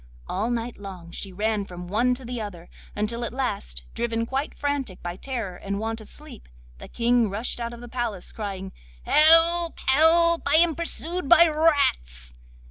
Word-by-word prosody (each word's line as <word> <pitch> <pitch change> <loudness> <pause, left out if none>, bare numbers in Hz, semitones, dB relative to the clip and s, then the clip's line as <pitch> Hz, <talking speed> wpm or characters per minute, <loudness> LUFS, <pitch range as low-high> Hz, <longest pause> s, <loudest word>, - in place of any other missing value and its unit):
All 210 +5 -2
night 240 0 -3
long 185 -4 -9
she 195 - -5
ran 210 +2 -1
from 180 -2 -9
one 240 +6 +1
to 255 0 -9
the 245 -1 -4
other, 180 -5 -8 0.3
until 225 +3 -2
at 235 - -2
last, - - -3
driven 230 -1 -1
quite 270 +5 -3
frantic 285 -9 -3
by 175 0 -4
terror 225 -5 -5
and 200 0 -4
want 225 +1 -3
of 215 - -12
sleep, 295 -6 -11 0.3
the - - -10
King 235 -1 +2
rushed 215 +5 -2
out 235 0 -3
of 235 0 -10
the 240 - -9
palace 230 -6 -4
crying: 195 -3 -6 0.3
'Help! 330 +2 +5
help! 330 +4 +4
I 285 - +3
am 335 0 +5
pursued 335 0 -1
by 340 0 +8
rats. 65 - +1
235 Hz, 175 wpm, -25 LUFS, 200-285 Hz, 0.3 s, by